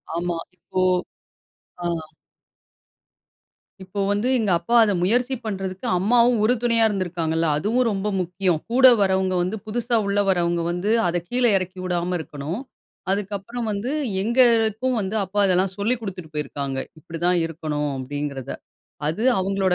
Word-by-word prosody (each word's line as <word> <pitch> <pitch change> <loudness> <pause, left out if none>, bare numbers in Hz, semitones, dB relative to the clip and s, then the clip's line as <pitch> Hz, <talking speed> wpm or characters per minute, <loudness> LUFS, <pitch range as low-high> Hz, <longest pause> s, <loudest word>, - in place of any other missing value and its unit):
ஆமா, 170 0 -1 0.2
இப்போ 185 +1 -3 1.0
அ. - - 0 2.0
இப்போ 195 +2 -6
வந்து 205 +4 0
எங்க 215 -4 +1
அப்பா 235 +8 -1
அத 205 - +2
முயற்சி 245 +8 +1
பண்றதுக்கு, 190 -2 -4
அம்மாவும் 235 +4 +4
உறுதுணையா 230 0 +3
இருந்திருக்காங்கல்ல. 170 -5 -1
அதுவும் 235 +9 +1
ரொம்ப 200 +1 -2
முக்கியம். 180 -2 0
கூட 260 +1 +7
வரவங்க 190 -1 +2
வந்து, 185 +5 -2
புதுசா 235 +1 0
உள்ள 200 +1 +1
வர்றவங்க 175 -2 +1
வந்து, 180 +4 -2 0.2
அத 175 +1 0
கீழே 245 -1 +2
இறக்கி 185 0 -5
விடாம 180 0 -1
இருக்கனும். 155 - -5 0.5
அதுக்கப்புறம் 205 +4 -3
வந்து 210 +6 -2 0.3
எங்களுக்கும் 235 +1 +3
வந்து 195 +2 -3
அப்பா 195 +2 -3
அதெல்லாம் 185 0 +2
சொல்லிக் 230 +4 0
குடுத்துட்டு 180 -7 -7
போயிருக்காறாங்க. 140 -2 -3 0.2
இப்டி 165 0 -8
தான் 180 0 +3
இருக்கனும். 150 -3 -3
அப்படின்கிறத. 140 0 -4 0.6
அது 170 +8 -2 0.2
அவங்களோட 190 -1 +1
190 Hz, 130 wpm, -23 LUFS, 175-220 Hz, 2.0 s, கூட